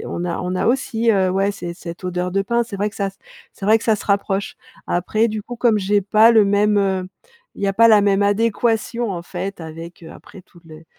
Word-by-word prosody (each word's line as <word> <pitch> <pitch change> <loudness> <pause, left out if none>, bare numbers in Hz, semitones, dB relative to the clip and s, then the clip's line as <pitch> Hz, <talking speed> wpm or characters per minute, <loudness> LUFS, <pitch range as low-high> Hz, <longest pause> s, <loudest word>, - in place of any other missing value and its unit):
et - - -7
on 175 - -4
a 170 - -3
on 180 0 -3
a 185 - -1
aussi, 235 -2 +1
heu, 190 -3 +2
ouais, 195 +2 +1
c'est 175 -3 -7
cette 170 +1 -9
odeur 180 0 -2
de 195 +1 +1
pins, 235 +4 0
c'est 225 -3 -8
vrai 205 +2 -1
que - - -16
ça 200 -1 -1
s 195 - -15 0.3
c'est 195 - -7
vrai 215 +2 +6
que - - -10
ça 220 -2 +2
se - - -10
rapproche. 200 -1 -1 0.3
Après, 215 +6 0
du 215 -1 -4
coup, 245 +3 -8
comme 230 -2 +2
j'ai 200 +1 +1
pas 215 +4 +5
le 220 -2 +5
même, 205 +1 +2
heu, 190 -2 -1 0.5
il - - -13
y - - +1
a 195 - 0
pas 230 +2 +6
la 215 -2 +6
même 200 0 +2
adéquation, 225 +2 0
en 175 - -5
fait, 195 +1 -6
avec 165 +2 -10
heu, 160 - -10
après 195 - -14
tout 175 -1 -21
le 160 0 -14
200 Hz, 255 wpm, -20 LUFS, 185-220 Hz, 0.5 s, vrai